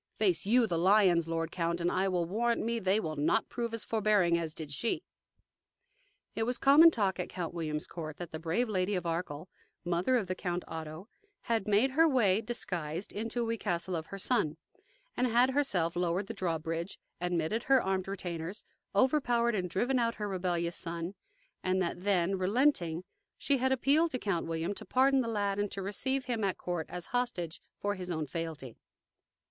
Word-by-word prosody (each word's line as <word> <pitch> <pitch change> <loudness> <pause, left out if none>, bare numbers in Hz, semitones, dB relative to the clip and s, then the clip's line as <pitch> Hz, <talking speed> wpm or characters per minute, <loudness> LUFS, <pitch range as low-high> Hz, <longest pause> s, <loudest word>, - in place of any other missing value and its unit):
Face 190 -4 +1
YOU 240 +2 +5
the 170 -6 -1
lions, 185 -3 +4
lord 165 0 -2
count, 170 -1 -1
and 175 +1 +1
I 190 +1 +1
will 180 -2 0
warrant 230 +7 0
me 230 0 0
they 195 +1 +2
will 155 -7 -3
not 150 +9 +1
prove 235 -1 -3
as 230 -1 -3
forbearing 210 -6 +3
as 165 -2 -2
did 155 -3 -6
she." 145 +12 -1 1.3
It - - -3
was 245 +2 +1
common 295 +5 +8
talk 200 - 0
at 180 - -3
Count 175 -2 -4
William's 155 -3 -3
court 155 -3 -7
that 175 -2 -7
the 160 - -5
brave 175 +10 0
Lady 195 -1 0
of 180 -2 -2
Arkell, 165 -1 -3 0.4
mother 175 +9 +2
of 220 - -1
the 185 - -2
Count 180 -1 -3
Otto, 160 +3 -7 0.3
had 225 -4 -1
made 210 +6 +3
her 325 +5 +5
way, 220 -7 +3
disguised, 180 -7 -4
into 230 +3 -2
we 230 0 -2
castle 175 +1 -1
of 160 -1 -4
her 195 - -7
son, 185 -7 0 0.6
had 250 +1 +3
herself 190 - +1
lowered 175 +2 0
the 225 - -6
drawbridge, 165 -2 -3 0.2
admitted 175 +5 -1
her 270 0 +5
armed 190 -3 -1
retainers, 180 0 -4 0.3
overpowered 240 -1 +3
and 185 -4 -1
driven 245 +8 +1
out 230 -1 +1
her 210 - -3
rebellious 175 -3 -1
son; 170 +1 -3 0.5
and 185 0 +1
that 175 -1 -2
then, 190 -1 +1
relenting, 185 - +2 0.3
she 280 - +1
had 260 +1 +1
appealed 280 +6 +3
to 255 - -2
Count 195 -9 -1
William 165 +3 -2
to - - -7
pardon 270 +1 +3
the 235 - -3
lad 205 -3 -1
and 205 -1 -1
to 195 - -4
receive 265 +7 -1
him 235 -4 -2
at 195 -2 0
court 175 -3 -3
as 175 -1 -5
hostage 225 -10 -2 0.2
for 205 0 -1
his 185 -2 -6
own 160 -3 -1
fealty. 150 -5 -5
190 Hz, 185 wpm, -31 LUFS, 170-230 Hz, 1.3 s, common